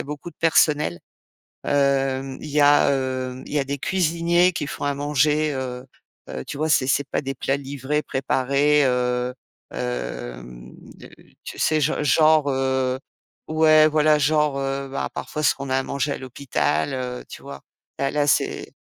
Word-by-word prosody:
a - - -4
beaucoup 150 +4 -7
de - - -27
personnel. 150 - +2 0.6
Hem, 135 -1 0
il 150 - -8
y 150 +1 +2
a, 145 0 +5
heu, 130 -1 -2
il - - -10
y 145 - +2
a - - +1
des 140 +1 -4
cuisiniers 170 +1 +2
qui 155 - -3
font - - -7
à 145 0 0
manger, 150 +1 +1
heu 125 -1 -5 0.4
heu, 65 - -6
tu - - -7
vois? 155 +2 -1
C'est 130 -4 +2
c'est 140 +1 +2
pas - - -1
des 135 -1 -4
plats 135 - -1
livrés, 140 +1 -3
préparés, 140 +2 +1
heu, 125 -1 0 0.4
hem, - - -6 0.7
tu - - -8
sais, 155 -1 +2
gen 150 +1 0
genre, 155 +1 +4
heu, 130 -1 0 0.5
ouais, 155 -1 +5
voilà 155 0 +3
genre, 150 -1 +1
heu, 135 0 -3
bah 135 - -3
parfois 150 -1 -4
ce - - +4
qu'on 140 -1 -7
a, 130 - +2
à 135 - 0
manger 140 +2 -2
à - - -7
l'hôpital, 135 +2 -2
heu, 125 -1 -5
tu - - -11
vois? 70 - -9 0.4
Là, 135 - +1
là 145 0 0
c'est - - 0
140 Hz, 175 wpm, -23 LUFS, 130-150 Hz, 0.7 s, a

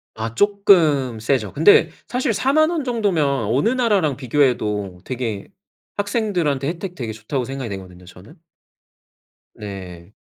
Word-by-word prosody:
아 110 0 -4
쪼끔 165 - +3
세죠. 110 -3 -1
근데 160 +8 +5 0.2
사실 250 -2 -1
40,000 290 +8 +3
원 335 -4 -2
정도면 210 - 0
어느 135 - +1
나라랑 205 - +1
비교해도 110 -8 0
되게 115 -6 -4 0.5
학생들한테 200 - -1
혜택 175 +3 -5
되게 115 -7 -5
좋다고 115 +4 -4
생각이 135 -2 -5
되거든요, 90 -2 -9
저는. 100 - -15 1.2
네. 95 -3 -9
135 Hz, 270 characters per minute, -21 LUFS, -, 1.2 s, 근데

